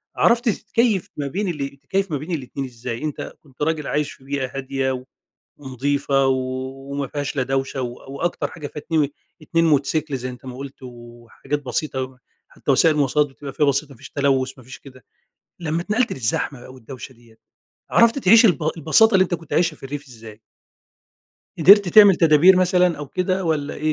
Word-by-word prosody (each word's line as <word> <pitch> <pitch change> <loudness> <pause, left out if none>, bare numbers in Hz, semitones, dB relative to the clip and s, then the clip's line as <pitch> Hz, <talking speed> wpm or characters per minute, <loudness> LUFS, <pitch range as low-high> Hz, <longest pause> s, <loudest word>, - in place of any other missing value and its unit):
عرفت 235 +1 +3
تتكيف 215 -1 0
ما 145 -1 -2
بين 195 +9 -3
ال 140 -5 -4
تتكيف 190 +7 -2
ما 150 - 0
بين 155 +6 -8
الاتنين 140 -3 -4
إزاي؟ 120 0 -6
أنت 150 -2 -5
كنت 135 -3 -21
راجل 155 -1 -1
عايش 150 -1 -1
في - - -16
بيئة 135 -2 -3
هادية 130 -1 -2 0.5
ونضيفة، 140 0 0
وما 135 +2 -3
فيهاش 145 +1 -4
لا 135 - +1
دوشة 135 0 -2
و 120 -1 -4 0.2
وأكتر 175 +5 -2
حاجة 155 -4 -8
فيها 150 +1 -8
اتني 150 -3 0 0.3
اتنين 165 +2 +1
موتوسيكل 150 -1 +1
زي 130 0 -5
أنت 125 +1 -12
ما 125 -1 -7
قلت 135 0 -9
وحاجات 120 +3 -7
بسيطة، 130 0 -3 0.3
حتى - - -5
وسائل 155 +4 +5
المواصلات 150 0 +2
بتبقى 140 0 -10
فيها 150 - +1
بسيطة، 140 +1 0
ما - - -15
فيش - - -12
تلوث 135 -2 +1
ما 130 - -14
فيش 125 - -11
كده، 130 -2 -16 0.6
لما 165 -1 -2
اتنقلت 220 +6 0
للزحمة 125 +2 -3
و 130 - -12
الدوشة 130 +2 -10
ديّة، 115 -2 -22 0.5
عرفت 235 +3 +4
تعيش 230 0 +6
الب 180 - +3 0.2
البساطة 195 +8 +4
اللي 190 - +6
أنت 180 -1 -1
كنت 165 -2 -9
عايشها 165 -3 +1
في - - -26
الريف 140 +1 -7
إزاي؟ 115 -3 -13 1.2
قدرت 200 +3 +7
تعمل 200 0 +7
تدابير 165 +3 +6
مثلًا 180 -2 +2
أو 145 - -6
كده 185 +3 -1
والّا 150 -3 -1
إيه 155 +1 -1
145 Hz, 180 wpm, -21 LUFS, 130-165 Hz, 1.2 s, قدرت